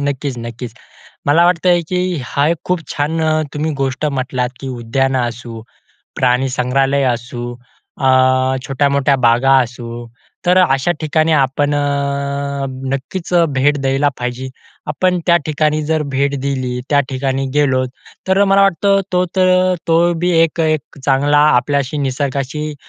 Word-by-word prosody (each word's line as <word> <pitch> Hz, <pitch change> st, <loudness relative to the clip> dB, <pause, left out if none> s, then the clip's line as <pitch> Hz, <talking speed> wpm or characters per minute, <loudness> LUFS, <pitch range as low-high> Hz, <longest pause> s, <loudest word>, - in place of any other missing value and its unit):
नक्कीच, 140 Hz, -1 st, -2 dB
नक्कीच. 115 Hz, 0 st, -7 dB, 0.5 s
मला 160 Hz, +4 st, +4 dB
वाटतंय 175 Hz, 0 st, +3 dB
की 180 Hz, -, -1 dB, 0.3 s
हा 140 Hz, +2 st, 0 dB
एक 170 Hz, -, +1 dB
खूप 180 Hz, -2 st, 0 dB
छान 150 Hz, +3 st, -2 dB, 0.3 s
तुम्ही 155 Hz, +2 st, -1 dB
गोष्ट 135 Hz, +2 st, -2 dB
म्हटलात 130 Hz, -3 st, -2 dB
की 135 Hz, -, -6 dB
उद्यानं 130 Hz, +2 st, -1 dB
असू, 115 Hz, -1 st, -9 dB, 0.5 s
प्राणीसंग्रहालय 130 Hz, +2 st, +1 dB
असू, 120 Hz, +1 st, -6 dB, 0.5 s
अ, 130 Hz, 0 st, +3 dB
छोट्या-मोठ्या 140 Hz, 0 st, +1 dB
बागा 135 Hz, +3 st, +4 dB
असू. 120 Hz, 0 st, -7 dB, 0.4 s
तर 180 Hz, +1 st, +4 dB
अशा 135 Hz, -2 st, +2 dB
ठिकाणी 155 Hz, +1 st, +1 dB
आपण 145 Hz, 0 st, +1 dB
अ, 140 Hz, -1 st, -2 dB, 0.3 s
नक्कीच 165 Hz, +7 st, -5 dB, 0.2 s
भेट 145 Hz, +3 st, +3 dB
द्यायला 135 Hz, +2 st, +1 dB
पाहिजे. 125 Hz, +1 st, -4 dB, 0.4 s
आपण 180 Hz, +4 st, +1 dB
त्या 170 Hz, -1 st, +5 dB
ठिकाणी 155 Hz, 0 st, 0 dB
जर 160 Hz, -1 st, 0 dB
भेट 140 Hz, +1 st, 0 dB
दिली, 130 Hz, -2 st, -2 dB
त्या 145 Hz, -, +4 dB
ठिकाणी 135 Hz, 0 st, -2 dB
गेलो. 130 Hz, -3 st, +2 dB, 0.4 s
तर 190 Hz, +1 st, +4 dB
मला 195 Hz, 0 st, +4 dB
वाटतं 195 Hz, +1 st, +3 dB
तो 180 Hz, 0 st, +2 dB
तर 185 Hz, 0 st, +3 dB
तो 165 Hz, 0 st, +3 dB, 0.2 s
बी 180 Hz, +1 st, +1 dB
एक 165 Hz, 0 st, +2 dB
एक 155 Hz, -2 st, -1 dB
चांगला 145 Hz, +2 st, +3 dB, 0.2 s
आपल्याशी 140 Hz, +2 st, 0 dB
निसर्गाशी 140 Hz, +2 st, -2 dB
140 Hz, 135 wpm, -16 LUFS, 130-155 Hz, 0.5 s, त्या